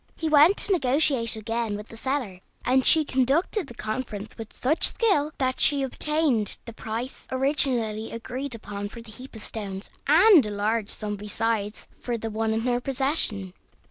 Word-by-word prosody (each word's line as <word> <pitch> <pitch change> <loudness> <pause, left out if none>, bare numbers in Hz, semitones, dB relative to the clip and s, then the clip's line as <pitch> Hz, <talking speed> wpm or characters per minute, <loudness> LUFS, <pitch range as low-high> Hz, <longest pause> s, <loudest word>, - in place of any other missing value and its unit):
He 320 - -3
went 310 +6 +6
to - - +1
negotiate 270 - +2
again 225 -1 -3
with 210 +1 -10
the - - -11
seller, 245 -6 -3 0.3
and 260 +1 +3
she 315 -1 +7
conducted 280 - 0
the 240 - -12
conference 215 -2 -5
with 225 -1 -9
such 295 +6 +2
skill 310 -10 +1
that 255 -2 -1
she 285 -2 +5
obtained 270 -5 +1
the 230 - -8
price 230 +4 -6
originally 260 -5 0
agreed 250 +3 -5
upon 205 -2 -7
for 235 - -10
the 225 - -13
heap 255 +3 -11
of 220 - -6
stones, 200 -2 -4 0.2
and 340 +2 +6
a 210 - -2
large 210 +1 -1
sum 210 -1 -2
besides 210 0 -3
for 240 -1 -3
the 225 0 -5
one 220 +1 -1
in 220 0 -1
her 245 +1 -1
possession. 265 - -1
240 Hz, 175 wpm, -25 LUFS, 215-275 Hz, 0.3 s, she